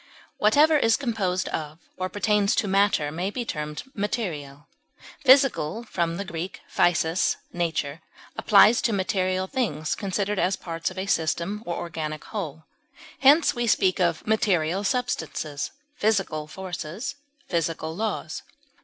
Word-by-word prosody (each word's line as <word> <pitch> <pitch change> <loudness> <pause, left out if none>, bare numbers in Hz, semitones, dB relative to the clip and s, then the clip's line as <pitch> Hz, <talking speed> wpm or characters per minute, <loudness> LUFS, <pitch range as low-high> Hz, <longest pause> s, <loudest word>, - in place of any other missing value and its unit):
Whatever 295 +9 +5
is 225 -3 +3
composed 205 -9 -1
of 155 0 -4 0.2
or 185 0 -3
pertains 205 0 +2
to 210 - +1
matter 195 -6 +2
may 175 +5 -2
be 240 +3 -4
termed 150 -5 -4
material; 160 - -4 0.6
physical 255 - +4
(Gr. 205 -6 -5
physis, 170 -1 0 0.2
nature) 160 -3 -2 0.3
applies 215 +3 +6
to 225 - +1
material 185 -1 0
things 155 - -1
considered 200 +3 -2
as 190 +2 +2
parts 165 -1 -4
of 185 - -12
a 190 - -2
system 170 +3 0
or 170 - -1
organic 155 -2 -5
whole; 160 -7 -5 0.6
hence, 290 +5 +6
we 240 0 -1
speak 190 -3 +3
of 170 -3 +1
material 195 -4 +1
substances, 160 - -2 0.3
physical 195 - 0
forces, 185 - -5 0.3
physical 165 -2 -2
laws. 220 +3 -3
185 Hz, 125 wpm, -25 LUFS, 160-210 Hz, 0.6 s, applies